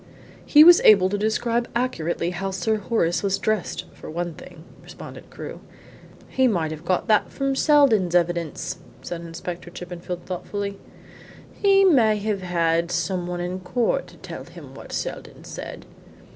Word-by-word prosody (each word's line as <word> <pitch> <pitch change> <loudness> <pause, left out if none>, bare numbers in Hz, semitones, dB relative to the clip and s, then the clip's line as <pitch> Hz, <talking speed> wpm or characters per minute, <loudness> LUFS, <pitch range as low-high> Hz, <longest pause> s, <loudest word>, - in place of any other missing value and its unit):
"He 300 +1 +8
was 345 +1 +8
able 190 -3 +6
to 205 - -1
describe 230 +3 0
accurately 175 -8 -1
how 190 +2 -3
Sir 195 +3 0
Horace 190 -5 0
was 195 -1 0
dressed 215 -2 -2
for - - -11
one 170 +1 -3
thing," 165 0 -13 0.2
responded - - -11
Crewe. - - -8 0.7
"He 260 -1 +2
might 170 -9 0
have 155 0 -7
got 180 +5 0
that 215 -2 +3
from 275 -1 -1
Seldon's 255 - +4
evidence," 170 -2 -1 0.2
said 170 -1 -5
Inspector 170 +1 -7
Chippenfield 175 0 -7
thoughtfully. 200 +2 -4 0.7
"He 390 -1 +4
may 235 - +5
have 205 -1 -2
had 170 -1 +1
some 175 +1 -1
one 175 0 -3
in 180 +1 -3
court 235 - -1
to - - -16
tell - - -8
him - - -13
what - - -11
Seldon - - -5
said." - - -8
185 Hz, 155 wpm, -23 LUFS, 175-220 Hz, 0.7 s, He